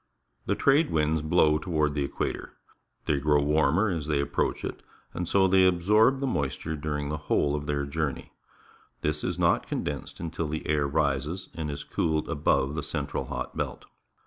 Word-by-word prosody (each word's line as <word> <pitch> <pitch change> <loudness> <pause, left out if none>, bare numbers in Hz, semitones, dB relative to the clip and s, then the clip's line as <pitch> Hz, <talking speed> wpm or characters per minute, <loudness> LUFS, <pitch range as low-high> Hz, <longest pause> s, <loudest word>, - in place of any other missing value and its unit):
The - - +2
trade 145 +3 +3
winds 80 0 +1
blow 75 -1 +3
toward 75 -4 0
the 70 -1 0
equator. 70 - -4 0.5
They 70 - +1
grow 75 +1 +3
warmer 80 +7 +3
as 80 -5 -3
they 75 -2 +1
approach 70 - -1
it, - - -6 0.3
and 90 - -3
so 95 +1 +4
they 95 0 +5
absorb 105 +9 +4
moisture 75 - -2
during 75 -1 -3
the 75 - -2
whole 70 -1 +2
of 75 0 -3
their 70 -1 0
journey. 70 0 -3 0.7
This 75 0 -1
is - - -2
not - - +2
condensed - - -4
until 80 -1 -3
the 80 +1 -4
air 75 -1 +2
rises 75 +4 -1
and 80 -2 -4
is 70 - -5
cooled 80 -2 -1
above 70 -1 +1
the 80 - -2
central 70 0 -3
hot - - -5
belt. - - -4
75 Hz, 170 wpm, -27 LUFS, 75-85 Hz, 0.7 s, they